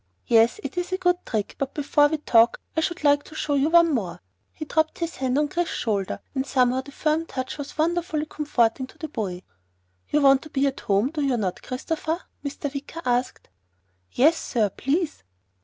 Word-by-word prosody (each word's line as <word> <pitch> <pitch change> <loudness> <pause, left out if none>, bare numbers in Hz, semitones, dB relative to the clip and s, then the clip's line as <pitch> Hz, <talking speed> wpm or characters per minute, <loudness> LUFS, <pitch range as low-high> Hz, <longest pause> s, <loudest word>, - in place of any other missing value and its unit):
"Yes, 230 - +4
it 360 - -3
is 355 +1 -4
a 370 - 0
good 355 -1 +1
trick, 215 -3 -2
but 275 -1 -3
before 290 0 +3
we 315 +1 -1
talk, 235 -5 +4 0.2
I 320 - +2
should 345 0 -2
like 290 -1 +5
to 310 - -13
show 295 - -1
you 285 +2 +2
one 335 -1 +5
more." 200 -9 -2 0.3
He 310 - -7
dropped 315 +1 0
his 335 -1 -4
hand 260 0 0
on 295 0 +2
Chris's 345 +3 -2
shoulder 200 -5 -2
and 265 -2 0
somehow 260 -2 +2
the 280 - -12
firm 310 +3 0
touch 260 +2 -5
was 285 +1 -7
wonderfully 325 -1 0
comforting 260 -5 0
to - - -19
the 315 - -6
boy. 190 -8 -4 0.7
"You 300 - +2
want 275 -1 +6
to 310 - -11
be 275 -1 +1
at 275 -1 -1
home, 205 +7 +1
do 310 -2 -3
you 270 -3 +1
not, 190 -5 -2
Christopher?" 315 +5 -3 0.3
Mr. 285 0 -4
Wicker 290 +4 -7
asked. 245 +1 -1 0.6
"Yes 310 +6 +4
sir. 215 -5 0
Please." 300 - -1
285 Hz, 200 wpm, -24 LUFS, 250-315 Hz, 0.7 s, want